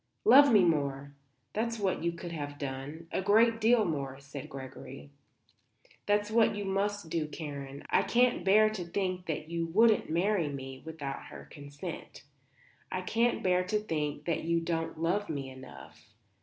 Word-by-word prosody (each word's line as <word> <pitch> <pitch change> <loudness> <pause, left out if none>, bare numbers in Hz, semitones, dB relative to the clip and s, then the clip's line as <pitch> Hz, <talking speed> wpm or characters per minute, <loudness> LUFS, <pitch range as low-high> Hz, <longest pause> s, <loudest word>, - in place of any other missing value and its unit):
"Love 285 - +8
me 210 -4 +6
more; 140 -4 0 0.4
that's 230 +2 -1
what 195 -5 -1
you 170 - +1
could 170 0 -8
have 145 -3 -5
done 145 +4 -6
a - - -1
great 225 +4 +4
deal 225 0 +4
more," 140 -5 -3
said 140 0 -9
Gregory. 130 - -9 1.0
"That's 205 0 +1
what 225 -1 +4
you 205 -1 -4
must 195 -2 -1
do, 160 -2 -1
Karen. 140 -3 -7
I - - +5
can't 245 -5 +2
bear 215 +3 +5
to 205 -5 -4
think 185 +1 -3
that 155 -1 -3
you 170 0 -1
wouldn't 220 +6 +4
marry 175 0 +1
me 135 -1 -7
without 155 -4 -6
her 70 -1 -11
consent. 145 +4 -8 0.7
I 185 - -2
can't 230 +6 +1
bear 180 -1 +3
to 210 +3 0
think 150 -7 -3
that 170 - -1
you 170 0 +1
don't 165 -1 -3
love 190 +5 0
me 140 -4 -4
enough. 80 - -12
170 Hz, 165 wpm, -30 LUFS, 145-205 Hz, 1.0 s, Love